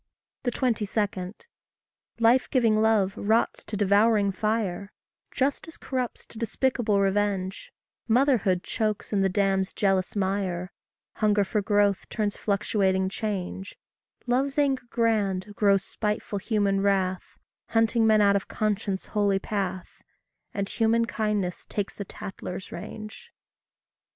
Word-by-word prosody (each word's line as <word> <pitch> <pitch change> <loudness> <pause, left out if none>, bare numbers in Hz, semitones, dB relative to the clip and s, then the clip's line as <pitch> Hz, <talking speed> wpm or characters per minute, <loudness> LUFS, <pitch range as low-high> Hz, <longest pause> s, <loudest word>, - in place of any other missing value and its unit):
22. 210 -6 -1 0.9
Life 235 +3 +4
giving 225 -5 +3
love 215 -3 +3
rots 220 +3 +1
to 210 - -5
devouring 205 +1 +3
fire; 200 -1 -2 0.4
Justice 285 +4 -2
corrupts 255 -2 -4
to 220 - -12
despicable 235 -3 +1
revenge; 195 -1 0 0.4
Motherhood 225 -7 +3
chokes 215 -2 -2
in 200 - +2
the 195 - +3
dam's 195 -1 +1
jealous 195 -1 +1
mire; 190 -2 -1 0.5
Hunger 210 -2 +3
for 210 +2 -1
growth 205 -1 +1
turns 210 -2 -1
fluctuating 195 -2 +1
change; 195 -2 -4 0.5
Love's 265 +3 0
anger 275 -3 +1
grand 210 -4 0
grows 200 -2 +3
spiteful 210 -1 -3
human 200 -2 +1
wrath, 190 -2 0 0.3
Hunting 225 0 +2
men 215 -1 +5
out 200 -1 +5
of 200 - -1
conscience' 205 -2 -1
holy 205 -2 +2
path; 190 -3 -4 0.5
And 200 -1 -2
human 230 +2 +2
kindness 210 -5 -2
takes 205 -2 -3
the 200 - -6
tattler's 190 0 -7
range. 215 - -8
205 Hz, 115 wpm, -26 LUFS, 195-225 Hz, 0.9 s, men